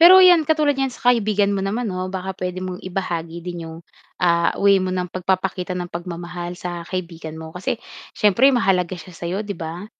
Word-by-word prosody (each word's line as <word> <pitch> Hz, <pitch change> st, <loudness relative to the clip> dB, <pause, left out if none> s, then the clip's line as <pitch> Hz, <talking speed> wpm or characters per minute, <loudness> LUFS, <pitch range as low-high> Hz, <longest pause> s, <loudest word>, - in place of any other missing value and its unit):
Pero 360 Hz, +3 st, +10 dB
‘yan, 360 Hz, -3 st, +8 dB
katulad 305 Hz, -1 st, +2 dB
niyan 270 Hz, 0 st, 0 dB
sa 245 Hz, -, -9 dB
kaibigan 210 Hz, -3 st, +2 dB
mo 195 Hz, -, -1 dB
naman 220 Hz, +5 st, -1 dB
'no, 185 Hz, -2 st, -3 dB
baka 190 Hz, 0 st, -4 dB
puwede 180 Hz, 0 st, -4 dB
mong 185 Hz, 0 st, -5 dB
ibahagi 170 Hz, -3 st, -3 dB
din 175 Hz, -1 st, -5 dB
yung, 160 Hz, -, -9 dB, 0.4 s
ah, 170 Hz, -1 st, +3 dB
way 200 Hz, -1 st, +5 dB
mo 185 Hz, -, -1 dB
ng 180 Hz, -1 st, -1 dB
pagpapakita 185 Hz, +1 st, -1 dB
ng 175 Hz, -, -3 dB
pagmamahal 175 Hz, 0 st, -6 dB
sa 175 Hz, -1 st, -5 dB
kaibigan 165 Hz, -3 st, -6 dB
mo, 160 Hz, 0 st, -9 dB
kasi 185 Hz, +5 st, -2 dB, 0.3 s
siyempre 220 Hz, +6 st, +4 dB
mahalaga 190 Hz, -8 st, +1 dB
siya 180 Hz, +1 st, -12 dB
sa'yo, 170 Hz, +2 st, -3 dB
'di 200 Hz, -, -3 dB
ba? 170 Hz, +4 st, -6 dB
185 Hz, 190 wpm, -22 LUFS, 175-200 Hz, 0.4 s, Pero